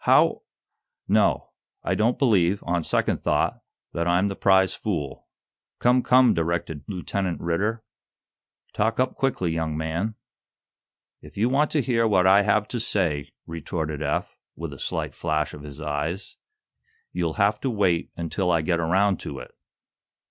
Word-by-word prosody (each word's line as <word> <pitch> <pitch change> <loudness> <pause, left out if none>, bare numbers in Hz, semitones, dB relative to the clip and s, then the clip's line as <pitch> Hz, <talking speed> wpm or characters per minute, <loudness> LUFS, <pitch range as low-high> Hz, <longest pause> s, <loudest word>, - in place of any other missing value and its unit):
"How - - +4 0.3
" - - -59
"No; - - 0 0.3
I - - 0
don't 115 +3 +1
believe, 100 -7 +2
on 85 0 0
second - - 0
thought, - - 0 0.3
that 85 0 -1
I'm 90 +3 +2
the 100 - -4
prize 95 -1 +3
fool." 80 -10 -4 0.5
"Come, 125 +1 +3
come," 125 -2 +5
directed 85 -3 -2
Lieutenant 95 -1 -3
Ridder. 105 +7 -1 0.9
"Talk 110 +3 0
up 130 - +1
quickly, 115 -11 -1
young 80 -2 -2
man." 85 +7 -2 1.1
"If - - -14
you 115 +4 +2
want 145 +3 +2
to 150 -3 +2
hear 115 -1 +2
what 95 -4 +3
I 95 +2 +6
have 105 +1 +2
to 120 - -3
say," 85 -10 0 0.2
retorted 80 -2 -4
Eph, - - -2 0.2
with 80 -3 -6
a 70 - -11
slight - - -3
flash 75 -2 -1
of 75 - -9
his 75 0 -9
eyes, 75 +5 -3 0.8
"you'll 85 -3 -1
have 105 +1 +2
to 135 - -1
wait 95 -7 +1
until 85 +2 -1
I 85 -2 +3
get 85 +1 +1
around 95 +3 +2
to - - -6
it." - - -9
90 Hz, 155 wpm, -25 LUFS, 80-105 Hz, 1.1 s, I